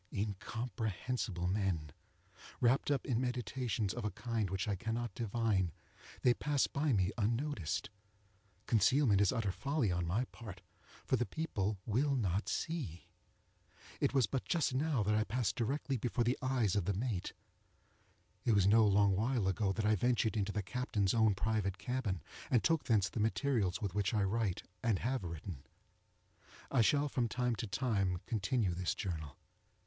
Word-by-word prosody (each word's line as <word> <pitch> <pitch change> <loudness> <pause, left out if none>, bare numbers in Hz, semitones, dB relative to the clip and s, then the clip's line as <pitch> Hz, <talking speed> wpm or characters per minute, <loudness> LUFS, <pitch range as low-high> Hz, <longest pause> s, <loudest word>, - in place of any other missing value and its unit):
Incomprehensible 110 -1 -3
men! 90 -6 0 0.7
Wrapped 125 +4 +3
up 140 -2 +1
in 125 -3 0
meditations 125 -4 -1
of 120 - -5
a 105 - 0
kind 115 -3 -2
which 95 +3 -2
I 105 - +1
cannot 115 +2 -3
divine, 110 -5 0 0.5
they 125 - +6
pass 145 +1 +1
me 120 -11 +2
by 110 - -1
unnoticed. 115 - -1 0.7
Concealment 115 -1 +4
is 100 - +4
utter 115 -6 0
folly 140 -1 0
on 85 -1 -1
my 105 +9 +1
part, 100 -5 -10 0.4
for 130 - +2
the 120 - 0
people 105 -11 -2
will 135 +6 +1
not 100 -4 0
see. 130 - -3 0.9
It - - +2
was 135 -4 +4
but 135 +2 -2
just 165 -6 +1
now 135 -3 +1
that 105 +2 +1
I 110 0 +3
passed 110 -2 -1
directly 135 +3 -1
before 120 +1 0
the 120 +2 0
eyes 125 -7 +1
of 100 -4 +1
the 100 - 0
mate; 105 -3 -2 1.1
it 120 - +3
was 100 -3 +4
no 110 +3 +6
long 100 -1 +4
while 115 0 +1
ago 95 +1 +1
that 105 +2 -2
I 105 - +4
ventured 115 +1 +1
into 100 -1 0
the 105 -1 -2
captain's 105 -3 0
own 110 -3 +4
private 100 -2 0
cabin, 110 -5 -2 0.3
and 120 - +3
took 165 -2 +2
thence 105 -5 +3
the 115 - -5
materials 110 -3 +1
with 100 -3 -2
which 100 +1 0
I 105 - +2
write, 100 -1 0 0.2
and 110 -3 +2
have 125 +2 -1
written. 85 -3 -6 1.1
I 135 - +4
shall 145 +6 +3
from 125 -4 0
time 125 +1 0
to 115 - -3
time 100 -4 0
continue 105 -2 0
this 90 +1 -1
journal. 80 -8 -4
110 Hz, 165 wpm, -35 LUFS, 95-125 Hz, 1.1 s, they